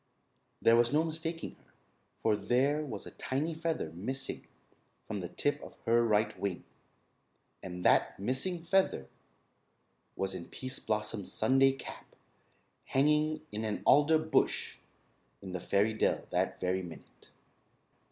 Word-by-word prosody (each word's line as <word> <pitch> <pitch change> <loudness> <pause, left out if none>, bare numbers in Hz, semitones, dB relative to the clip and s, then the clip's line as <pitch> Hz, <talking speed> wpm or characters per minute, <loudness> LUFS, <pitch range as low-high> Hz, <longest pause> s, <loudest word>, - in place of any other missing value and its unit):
There 115 - +7
was 120 0 +4
no 155 +2 +3
mistaking 165 +1 -4
her, - - -29 0.4
for 110 -2 +2
there 140 +7 +1
was 135 -7 -6
a - - -9
tiny 150 +5 -2
feather 160 - -2
missing 130 +11 -5 0.6
from 105 -2 -4
the 90 - -4
tip 145 +8 -1
of - - -11
her 120 +1 +4
right 110 -1 +2
wing, 100 -3 -2 1.0
and 90 -1 -7
that - - +4
missing 135 - -1
feather 170 - +1 1.1
was 95 0 -1
in 85 - -6
Pease 130 0 -4
Blossom's 105 -2 -2
Sunday 135 +4 +4
cap 135 - -10 0.7
hanging 150 +2 +2
in 105 +1 -3
an 105 -1 -2
alder 150 +2 +6
bush 160 0 +1 0.6
in 95 - -8
the 90 - -3
fairy 100 +5 +2
dell 110 - +1
that - - 0
very 95 +1 0
minute. 85 -3 -12
125 Hz, 135 wpm, -32 LUFS, 105-150 Hz, 1.1 s, There